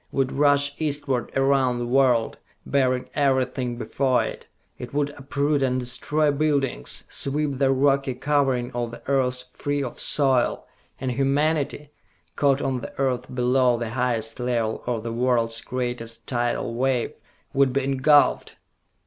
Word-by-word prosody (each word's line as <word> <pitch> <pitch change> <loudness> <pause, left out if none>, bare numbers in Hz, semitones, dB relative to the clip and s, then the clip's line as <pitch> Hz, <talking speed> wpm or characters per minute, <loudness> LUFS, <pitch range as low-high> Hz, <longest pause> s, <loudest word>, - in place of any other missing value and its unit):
would 135 -1 0
rush 140 0 +3
eastward 145 -4 -1
around 135 -2 +2
the 120 - -2
world, 125 -2 +2 0.3
bearing 130 -2 +1
everything 130 -3 0
before 130 +1 +1
it! - - -7 0.3
It 125 +3 -8
would 145 0 +1
uproot 140 +1 -1
and 130 -1 +1
destroy 145 +5 0
buildings, 145 -2 -1
sweep 140 -1 -2
the 135 -1 +3
rocky 135 -1 +2
covering 135 -3 0
of 120 -1 -3
the 120 - -11
earth 130 -2 +1
free 145 0 -2
of 125 - -6
soil; 135 -4 +2 0.3
and 130 -1 -2
humanity, 145 +2 0 0.4
caught 140 0 +2
on 135 -2 -1
the - - -9
earth 130 -2 0
below 125 0 +3
the 115 -1 -4
highest 115 -2 -1
level 120 -3 -1
of 115 -3 -1
the 115 0 -4
world's 115 -2 +1
greatest 120 -2 -4
tidal 120 -1 -1
wave, 125 0 0 0.4
would 135 -1 +3
be 135 +1 0
engulfed!" 140 +2 +3
130 Hz, 140 wpm, -24 LUFS, 125-140 Hz, 0.4 s, rush